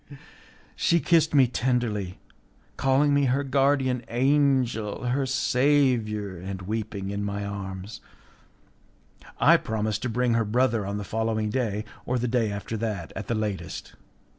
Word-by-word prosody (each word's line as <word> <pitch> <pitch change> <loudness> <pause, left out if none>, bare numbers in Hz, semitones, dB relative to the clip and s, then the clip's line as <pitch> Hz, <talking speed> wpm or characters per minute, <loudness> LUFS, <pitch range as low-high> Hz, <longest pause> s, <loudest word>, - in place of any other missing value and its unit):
She 170 - +2
kissed 160 -2 +3
me 135 -2 +7
tenderly, 120 -6 -1 0.6
calling 140 +2 +3
me 140 0 +3
her 135 +2 +1
guardian 135 -2 +1
angel, 130 -4 +1
her 130 +2 0
saviour, 125 -7 +1
and 95 +1 -6
weeping 100 -1 -4
in 100 0 -3
my 100 0 -3
arms. 100 0 -6 1.4
I - - +6
promised 110 -1 -2
to 130 - -2
bring 120 +1 +1
her 115 0 +2
brother 115 -1 +1
on 100 +1 -3
the 105 - -4
following 110 0 -1
day, 110 -4 -1 0.2
or 125 - +1
the 125 +1 -1
day 115 -3 +1
after 100 +2 -5
that 105 -6 -4
at 105 - -6
the 115 - 0
latest. 105 -3 -4
115 Hz, 140 wpm, -26 LUFS, 105-130 Hz, 1.4 s, me